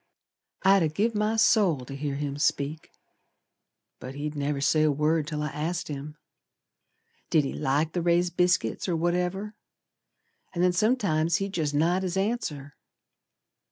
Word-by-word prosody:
I'd 195 0 +5
ha' 160 -2 +1
give 215 +8 0
my 210 +1 0
soul 195 - +3
to 135 - -8
hear 140 0 -3
him 145 0 -4
speak. 145 +2 -1 1.1
But 130 +2 -8
he'd 150 +1 -4
never 145 0 -2
say 150 +2 +2
a 155 -1 +4
word 150 +2 +1
till 150 -1 -3
I 150 - -2
asked 165 +5 -3
him 150 +1 -7 1.1
Did 155 - +3
he 135 - -3
like 150 +3 0
the 175 - -1
raised 175 +1 +1
biscuits 180 - +1
or 175 - +1
whatever, 180 +5 -1 1.0
An' 175 - +1
then 180 0 +3
sometimes 175 -6 +1
he'd 195 +1 -2
jest 150 -5 -1
nod 170 +5 +2
his 185 0 -2
answer. 175 - -2
160 Hz, 155 wpm, -27 LUFS, 145-180 Hz, 1.1 s, I'd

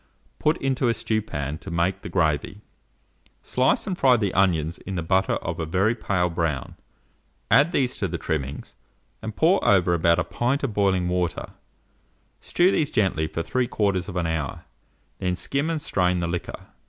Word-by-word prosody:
put 155 +2 +2
into 135 -1 0
a 115 - +2
stewpan 75 -10 -2
to - - -9
make 85 +2 0
the - - -7
gravy; 80 +6 0 0.8
slice 130 +1 +1
and 185 -4 -3
fry 130 -2 +5
the 100 -4 -1
onions 85 -4 +1
in 95 - -6
the 85 - -2
butter 95 +3 +2
of - - -4
a - - -1
very 95 +7 +2
pale 90 -6 0
brown; 80 -5 -2 0.8
add 150 +5 +5
these 130 -7 0
to 100 - -1
the 85 -1 -4
trimmings, 70 -4 -4 0.5
and 110 -1 -6
pour 175 +5 +3
over 90 -3 +4
about 85 0 +3
a 90 - +1
pint 125 - -1
of 130 -6 -1
boiling 95 -3 +2
water; 90 -1 -2 0.9
stew 180 +2 +2
these 150 -6 +1
gently 90 -7 +1
for 85 +1 -4
3/4 100 -7 -1
hour, 80 -4 -3 0.5
then 90 -1 -1
skim 140 - -1
and 165 -1 -1
strain 90 -1 +1
the 85 - -1
liquor. 85 +1 -5
95 Hz, 165 wpm, -24 LUFS, 85-120 Hz, 0.9 s, fry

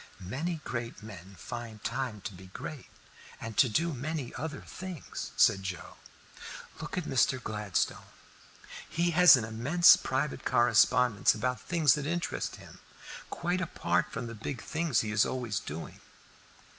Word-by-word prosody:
"Many 165 +4 -2
great 120 -3 -5
men 100 -3 -11
find 115 0 -7
time 125 -6 -3
to 105 - -6
be 95 +1 -12
great 125 +8 -8 0.5
and 115 -1 -6
to 125 - +5
do 165 +9 0
many 140 0 -4
other 150 +1 -5
things," 185 -5 -7
said 95 - +5
Joe. 95 -3 -6 0.8
"Look - - -6
at 180 - 0
Mr. 130 -2 +2
Gladstone; 105 -5 -2 0.8
he 170 +1 +1
has 175 -3 +8
an 115 - -2
immense 135 +11 +6
private 135 +2 -2
correspondence 120 -1 +4
about 125 +3 -2
things 160 -7 +3
that 145 -1 -3
interest 170 +2 -2
him, - - -14 0.5
quite 175 +2 -1
apart 90 - 0
from 115 +1 -4
the 115 - -6
big 115 +3 -6
things 160 -7 0
he 105 - -3
is 105 0 +4
always 120 -6 -2
doing." 80 +2 -7
125 Hz, 145 wpm, -30 LUFS, 110-155 Hz, 0.8 s, has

